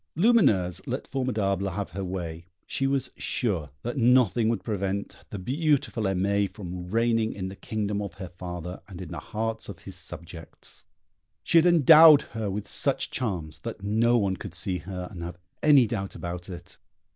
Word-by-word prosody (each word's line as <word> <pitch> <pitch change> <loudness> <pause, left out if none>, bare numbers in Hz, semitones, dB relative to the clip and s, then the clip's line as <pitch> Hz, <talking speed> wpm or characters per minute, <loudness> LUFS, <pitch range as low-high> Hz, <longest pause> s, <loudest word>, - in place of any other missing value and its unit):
Lumineuse 105 - +4
let 130 +2 -3
Formidable 105 -8 0
have 100 +1 -4
her 100 +1 -4
way; 85 -2 -5 0.2
she 135 - -1
was 135 -1 0
sure 90 -11 -1
that 120 +3 -3
nothing 120 -3 +4
would 115 - -1
prevent 100 -2 -2
the 105 - -5
beautiful 135 - 0
Aimée 100 +1 +1
from 90 -2 -7
reigning 115 +1 +1
in 95 -1 -4
the 95 - -8
kingdom 105 0 -2
of 100 -5 -6
her 95 -2 -7
father, 90 0 -7
and 95 -4 -10
in 90 - -7
the - - -4
hearts 110 0 -4
of 100 - -7
his 95 - -9
subjects. 85 -1 -6 0.6
She 165 - +5
had 170 - +4
endowed 160 -2 +8
her 110 -3 -2
with 100 +2 -4
such - - +1
charms 85 -10 -3
that 85 - -7
no 115 +4 +3
one 95 -4 0
could - - -8
see 95 -4 -1
her 90 +2 -6
and 90 -4 -8
have 85 +1 -6 0.2
any 145 -4 +6
doubt 100 -3 -4
about 85 0 -6
it. 85 -1 -10
100 Hz, 175 wpm, -27 LUFS, 90-115 Hz, 0.6 s, endowed